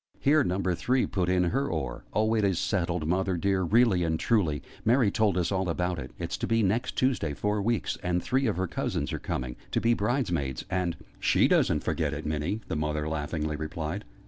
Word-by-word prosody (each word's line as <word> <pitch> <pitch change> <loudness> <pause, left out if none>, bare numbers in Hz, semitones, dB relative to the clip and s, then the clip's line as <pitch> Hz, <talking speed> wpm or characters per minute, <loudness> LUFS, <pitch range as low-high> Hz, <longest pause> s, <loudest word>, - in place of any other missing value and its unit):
Here 150 +2 +4
Number 95 0 0
Three 125 +9 +1
put 90 -3 -1
in 90 -1 +3
her 135 +11 0
oar. 70 -8 -4
"Oh, 110 +2 +2
it 110 -2 +2
is 95 -3 +2
settled, 85 -5 0
Mother 95 +1 +1
dear, 95 +2 +1
really 100 0 +3
and 80 -1 0
truly! 85 - +1 0.2
Mary 115 -2 +4
told 105 -3 +2
us 90 +1 0
all 95 -2 0
about 90 +1 -1
it. - - -6
It's - - -3
to - - -3
be 115 -1 +2
next 110 +6 0
Tuesday 125 - +1
four 105 +4 0
weeks 115 0 -1
and 90 0 0
three 130 0 +1
of 105 - 0
her 95 - 0
cousins - - -2
are - - -2
coming; 60 -1 -4
to - - 0
be 115 +1 +3
bride's 120 +1 0
maids 70 -7 -2
and 90 -2 0
" - - -28
"She - - +5
doesn't - - +2
forget 75 -3 -1
it, 75 - -6
Minnie!" 75 +8 -2
the - - -2
Mother 75 0 -1
laughingly 75 0 -2
replied. 80 +5 -4
90 Hz, 215 wpm, -28 LUFS, 80-110 Hz, 0.2 s, She